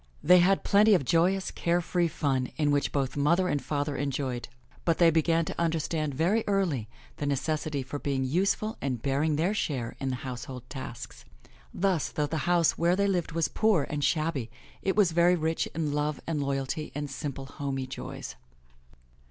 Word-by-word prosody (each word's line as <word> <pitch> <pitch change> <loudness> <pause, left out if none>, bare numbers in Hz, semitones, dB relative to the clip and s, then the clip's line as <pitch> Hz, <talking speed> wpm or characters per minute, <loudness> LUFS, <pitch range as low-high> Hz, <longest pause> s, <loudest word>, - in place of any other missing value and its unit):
They 180 +2 +7
had 190 +2 +3
plenty 210 +1 +5
of 145 - 0
joyous, 180 +6 +2
care 170 +1 +1
free 175 0 0
fun 135 -5 -1
in 150 -2 +2
which 145 0 +1
both 135 -2 -1
mother 170 +6 +2
and 145 -5 0
father 145 -1 -2
joined, 130 -3 -3 0.3
but 165 -2 +2
they 170 -2 +6
began 165 +1 +2
to - - -4
understand 160 -3 -1
very 185 +10 +2
early 175 - 0 0.3
the 145 - -2
necessity 145 0 -1
for 140 +3 -6
being 135 -2 -1
useful 195 - 0
and 130 -3 -2
bearing 145 +4 +1
their 170 +7 +1
share 130 - -2
in 135 - -2
the 130 - -1
household 125 0 -7
tasks. 130 -4 -8 0.5
Thus, 185 -5 0
though 150 - -1
the 160 +2 -2
house 170 -2 +3
where 170 +1 +3
they 200 +1 +2
lived 180 -4 0
was 165 -2 +1
poor 215 -9 +2
and 145 -1 -2
shabby, 155 -7 0 0.3
it 190 - 0
was 200 -5 +4
very 175 +2 +4
rich 160 -1 -1
in 155 -2 -1
love 150 0 -1
and 155 -3 -1
loyalty 140 +2 -2
and 145 0 -3
simple 140 -1 -5
homey 135 -1 -4
joys. 130 - -7
155 Hz, 180 wpm, -28 LUFS, 140-175 Hz, 0.5 s, They